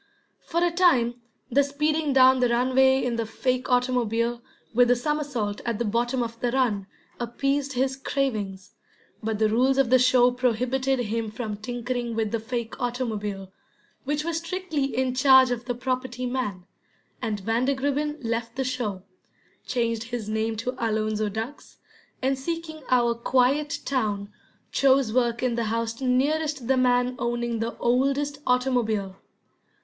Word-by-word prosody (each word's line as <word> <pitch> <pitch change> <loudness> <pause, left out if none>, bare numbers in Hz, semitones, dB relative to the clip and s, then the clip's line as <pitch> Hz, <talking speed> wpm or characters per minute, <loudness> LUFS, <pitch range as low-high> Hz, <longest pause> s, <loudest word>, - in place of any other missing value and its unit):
For 340 +1 -1
a 350 - +2
time 250 -10 +3 0.3
the 280 +4 +4
speeding 300 +2 0
down 260 -1 +6
the 250 -1 +3
runway 260 +2 +3
in 240 -2 -1
the 230 - -1
fake 255 +3 -1
automobile, 240 -2 +1 0.3
with 245 +1 +5
the 245 - +4
somersault 255 -7 -2
at 235 -3 -2
the 235 - -1
bottom 240 +4 0
of 230 0 -6
the 240 0 0
run, 230 -7 0 0.3
appeased 275 +4 -1
his 265 +1 0
cravings, 215 -9 -3 0.5
but 220 -1 -2
the 215 0 +3
rules 255 +5 +2
of 270 -3 +2
the 255 - +7
show 250 0 +5
prohibited 250 +2 0
him 225 0 -2
from 215 -1 -4
tinkering 240 +2 -4
with 220 -2 -1
the 230 - 0
fake 235 +2 -5
automobile, 210 -6 -3 0.5
which 295 +2 -1
was 335 0 -2
strictly 335 -3 -2
in 260 -1 -1
charge 260 0 +6
of 240 0 -3
the 245 -1 -2
property 255 0 -3
man, 245 -8 -3 0.6
and 215 -4 -2
Vandergribbin 275 +7 0
left 230 0 -2
the 265 - -1
show, 240 -7 -3 0.6
changed 230 -2 -1
his 230 -2 -5
name 220 +1 -1
to 250 +4 -2
Alonzo 215 -1 0
Duggs, 225 +7 -7 0.5
and 265 0 +1
seeking 325 +1 -5
our 240 -2 +3
quiet 260 +5 +1
town, 210 -6 -1 0.4
chose 265 -4 +3
work 240 -1 +1
in 250 -2 +1
the 235 -1 -1
house 230 +2 -2
nearest 280 +1 0
the 265 - +3
man 250 0 +2
owning 240 -1 -1
the 230 +1 -3
oldest 275 +4 +1
automobile. 235 -6 +1
245 Hz, 150 wpm, -25 LUFS, 230-265 Hz, 0.6 s, the